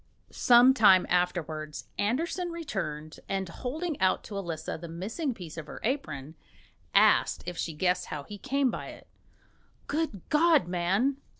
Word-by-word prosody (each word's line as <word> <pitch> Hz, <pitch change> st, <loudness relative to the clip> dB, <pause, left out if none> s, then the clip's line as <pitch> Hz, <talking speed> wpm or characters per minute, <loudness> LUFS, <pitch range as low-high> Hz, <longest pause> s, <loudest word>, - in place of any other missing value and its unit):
Some 245 Hz, +2 st, +6 dB
time 200 Hz, -7 st, +6 dB
afterwards 160 Hz, -4 st, -1 dB
Andersen 330 Hz, -, -1 dB
returned, 155 Hz, -, -5 dB
and 195 Hz, -1 st, -1 dB
holding 285 Hz, -, -4 dB
out 185 Hz, -, +2 dB
to 205 Hz, -, -8 dB
Elisa 165 Hz, -5 st, -4 dB
the 170 Hz, +1 st, -8 dB
missing 220 Hz, -, -3 dB
piece 170 Hz, -5 st, -9 dB
of 160 Hz, -, -6 dB
her -, -, -8 dB
apron, 155 Hz, -, -3 dB, 0.6 s
asked -, -, +4 dB
if 180 Hz, -, -5 dB
she 165 Hz, -, -3 dB
guessed 180 Hz, +3 st, 0 dB
how 145 Hz, -, -5 dB
he 205 Hz, +6 st, -10 dB
came 275 Hz, 0 st, +1 dB
by -, -, -6 dB
it. -, -, -11 dB, 0.8 s
"Good 300 Hz, -, -2 dB
God, 310 Hz, -, +4 dB
man!" 190 Hz, +10 st, +1 dB
195 Hz, 145 wpm, -28 LUFS, 170-270 Hz, 0.8 s, Some